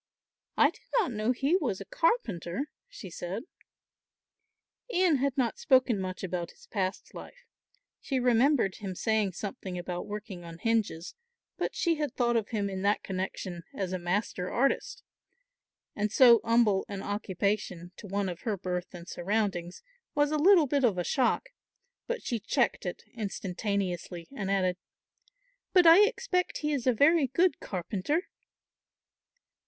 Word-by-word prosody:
"I -, -, +5 dB
did -, -, -20 dB, 0.2 s
not 410 Hz, -, +2 dB
know 215 Hz, +1 st, 0 dB
he 275 Hz, +7 st, +1 dB
was 265 Hz, -, 0 dB
a -, -, -7 dB
carpenter," 290 Hz, -, -1 dB, 0.2 s
she 230 Hz, -, -10 dB
said. 180 Hz, +6 st, -5 dB, 1.5 s
Ian 360 Hz, -6 st, +3 dB
had 275 Hz, 0 st, -1 dB
not 245 Hz, -4 st, 0 dB
spoken 255 Hz, -6 st, +3 dB
much 185 Hz, 0 st, -5 dB
about 175 Hz, -2 st, -3 dB
his -, -, -18 dB
past 190 Hz, -2 st, -3 dB
life. -, -, -11 dB, 0.5 s
She 265 Hz, -, -2 dB
remembered 245 Hz, -3 st, +3 dB
him 195 Hz, -3 st, -5 dB
saying 215 Hz, -2 st, +1 dB
something 190 Hz, -1 st, -6 dB
about 175 Hz, 0 st, -4 dB
working 205 Hz, -3 st, -7 dB
on 165 Hz, -1 st, -9 dB
hinges, 210 Hz, -5 st, -1 dB, 0.4 s
but -, -, -3 dB
she 335 Hz, -3 st, +1 dB
had 295 Hz, -4 st, -3 dB
thought 240 Hz, -1 st, +1 dB
of 220 Hz, -3 st, 0 dB
him 210 Hz, -3 st, -1 dB
in 190 Hz, -1 st, -4 dB
that 200 Hz, +2 st, +1 dB
connexion 185 Hz, -2 st, -4 dB
as 185 Hz, -2 st, -3 dB
a 185 Hz, -, -2 dB
master 180 Hz, 0 st, -2 dB
artist, 275 Hz, -, 0 dB, 0.9 s
and 210 Hz, 0 st, -1 dB
so 235 Hz, -2 st, +7 dB
humble 230 Hz, -4 st, +3 dB
an 200 Hz, -1 st, -5 dB
occupation 200 Hz, -3 st, -2 dB
to 210 Hz, -, -9 dB
one 200 Hz, +1 st, -1 dB
of 175 Hz, -2 st, -5 dB
her 215 Hz, -3 st, -2 dB
birth 180 Hz, 0 st, -4 dB
and 175 Hz, 0 st, -10 dB
surroundings 185 Hz, -2 st, -2 dB, 0.3 s
was 290 Hz, 0 st, +2 dB
a 305 Hz, -, +1 dB
little 350 Hz, 0 st, +6 dB
bit 280 Hz, 0 st, 0 dB
of 220 Hz, -7 st, +3 dB
a 180 Hz, -, 0 dB
shock; 265 Hz, -, +1 dB, 0.6 s
but 485 Hz, 0 st, -3 dB
she 235 Hz, -, -2 dB
checked 230 Hz, -2 st, 0 dB
it 175 Hz, -, -5 dB
instantaneously 195 Hz, -5 st, -3 dB
and 195 Hz, -6 st, -3 dB
added, 185 Hz, -2 st, +1 dB, 1.0 s
"But 360 Hz, -2 st, +6 dB
I 330 Hz, +3 st, +9 dB
expect 445 Hz, -6 st, -1 dB
he 300 Hz, -, +1 dB
is 260 Hz, -3 st, -2 dB
a -, -, +7 dB
very 285 Hz, +5 st, +4 dB
good 340 Hz, +8 st, +2 dB
carpenter." 200 Hz, -, -2 dB
210 Hz, 155 wpm, -29 LUFS, 185-275 Hz, 1.5 s, I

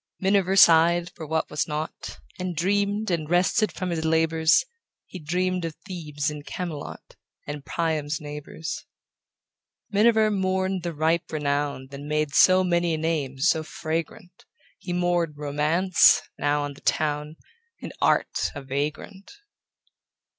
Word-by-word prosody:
Miniver 195 Hz, 0 st, +2 dB
sighed 170 Hz, 0 st, +5 dB
for 160 Hz, -3 st, -9 dB
what 160 Hz, +1 st, -1 dB
was 150 Hz, +1 st, -1 dB
not, 155 Hz, +1 st, -5 dB, 0.2 s
And 180 Hz, -1 st, -3 dB
dreamed, 200 Hz, +4 st, 0 dB
and 155 Hz, -3 st, -2 dB
rested 180 Hz, +5 st, +2 dB
from 185 Hz, -2 st, -4 dB
his 160 Hz, -2 st, -2 dB
labors; 160 Hz, -, +3 dB, 0.4 s
He 185 Hz, -, -9 dB
dreamed 180 Hz, +3 st, -1 dB
of 165 Hz, -2 st, -4 dB
Thebes 155 Hz, -6 st, -3 dB
and 150 Hz, -1 st, -8 dB
Camelot, 165 Hz, -2 st, -7 dB, 0.3 s
And 145 Hz, -1 st, -6 dB
Priam's 155 Hz, -3 st, -2 dB
neighbors. 150 Hz, +2 st, -7 dB, 1.1 s
Miniver 215 Hz, +1 st, +4 dB
mourned 190 Hz, -1 st, 0 dB
the 170 Hz, 0 st, -3 dB
ripe 160 Hz, +3 st, 0 dB
renown 145 Hz, -3 st, -2 dB
That 140 Hz, 0 st, -8 dB
made 150 Hz, 0 st, -1 dB
so 185 Hz, +3 st, +6 dB
many 175 Hz, -2 st, +1 dB
a -, -, -3 dB
name 155 Hz, -4 st, -2 dB
so 160 Hz, +3 st, +2 dB
fragrant; 160 Hz, +2 st, -5 dB, 0.3 s
He 185 Hz, -, -6 dB
mourned 175 Hz, -3 st, 0 dB
Romance, 150 Hz, +5 st, +3 dB
now 145 Hz, 0 st, 0 dB
on 145 Hz, 0 st, -4 dB
the -, -, -17 dB
town, 150 Hz, 0 st, -1 dB, 0.4 s
And -, -, -8 dB
Art, -, -, +1 dB
a 140 Hz, -, -6 dB
vagrant. 150 Hz, +8 st, -4 dB
160 Hz, 135 wpm, -25 LUFS, 150-180 Hz, 1.1 s, so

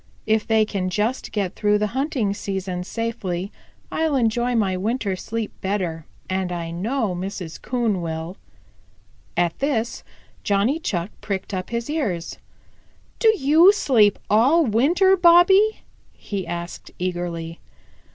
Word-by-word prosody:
If 220 Hz, 0 st, +1 dB
they 220 Hz, -1 st, +3 dB
can 190 Hz, -3 st, -2 dB
just 215 Hz, +6 st, -1 dB
get 200 Hz, -3 st, -2 dB
through 210 Hz, -1 st, +2 dB
the 210 Hz, -, 0 dB
hunting 260 Hz, -7 st, 0 dB
season 190 Hz, -3 st, -4 dB
safely, 200 Hz, -4 st, -3 dB, 0.4 s
I'll 320 Hz, -2 st, 0 dB
enjoy 240 Hz, 0 st, +1 dB
my 200 Hz, -5 st, +1 dB
winter 205 Hz, +1 st, -1 dB
sleep 220 Hz, +3 st, -4 dB
better, 180 Hz, -5 st, -2 dB, 0.2 s
and 185 Hz, -1 st, -2 dB
I 170 Hz, -1 st, -4 dB
know 215 Hz, +4 st, -1 dB
Mrs. 180 Hz, -2 st, -6 dB
Coon 230 Hz, -6 st, -1 dB
will." 165 Hz, +2 st, -4 dB, 1.0 s
At 175 Hz, -1 st, +1 dB
this 245 Hz, -5 st, -1 dB, 0.4 s
Johnny 210 Hz, +10 st, +1 dB
Chuck 180 Hz, -, -3 dB
pricked 195 Hz, 0 st, -4 dB
up 185 Hz, -1 st, -3 dB
his 235 Hz, 0 st, -3 dB
ears. 220 Hz, -, -3 dB, 0.8 s
"Do 450 Hz, -2 st, +6 dB
you 320 Hz, +6 st, +6 dB
sleep 230 Hz, -, +3 dB
all 270 Hz, +11 st, +4 dB
winter, 330 Hz, -, +4 dB
Bobby?" 375 Hz, +4 st, +5 dB, 0.3 s
he 195 Hz, -3 st, -5 dB
asked 170 Hz, 0 st, -6 dB
eagerly. 175 Hz, -2 st, -4 dB
210 Hz, 130 wpm, -22 LUFS, 185-255 Hz, 1.0 s, Do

